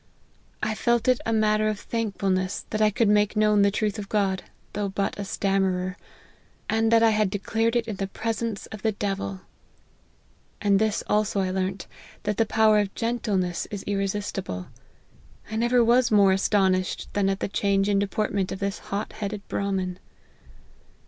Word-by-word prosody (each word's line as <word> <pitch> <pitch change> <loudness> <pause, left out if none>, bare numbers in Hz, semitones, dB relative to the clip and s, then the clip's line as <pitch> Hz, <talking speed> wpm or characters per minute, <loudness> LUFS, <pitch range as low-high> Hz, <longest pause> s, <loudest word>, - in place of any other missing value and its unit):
I 220 - +1
felt 235 +1 +1
it 255 -1 +3
a - - +1
matter 215 -1 +2
of 215 -1 -1
thankfulness 195 -5 -2
that 215 - -1
I 215 - +5
could 225 +2 +1
make 210 0 +3
known 210 -1 +4
the 200 - +5
truth 210 +1 -1
of 200 - -7
God, 195 -3 +1 0.3
though 205 -1 -2
but 195 +1 -2
a - - -2
stammerer; 190 -2 0 0.7
and 225 0 +1
that 230 0 +5
I 225 - +6
had 215 -2 +2
declared 225 +4 0
it 235 -1 +1
in 215 -3 -4
the 195 - -2
presence 225 +1 -3
of 215 - -8
the 220 +1 +1
devil. 195 - -3 1.2
And 200 -1 +3
this 215 -1 0
also 210 -1 +1
I 185 -1 -1
learnt, 190 0 -2 0.4
that 210 -1 -1
the 225 - +2
power 220 -1 +4
of 200 -1 -2
gentleness 210 -7 -1
is 205 -2 -5
irresistible. 195 - -3 0.8
I - - -3
never 240 +2 +3
was 240 +1 +4
more 200 -3 +5
aston 195 0 +3
ished 185 0 -2
than 200 -1 +2
at 195 0 -1
the - - -1
change 200 0 +1
in 200 -1 +2
deportment 200 -1 -1
of - - -3
this 200 0 -3
hot 200 +2 -4
headed 210 -1 -5
Brahmin." 190 -2 -2
205 Hz, 175 wpm, -25 LUFS, 195-220 Hz, 1.2 s, I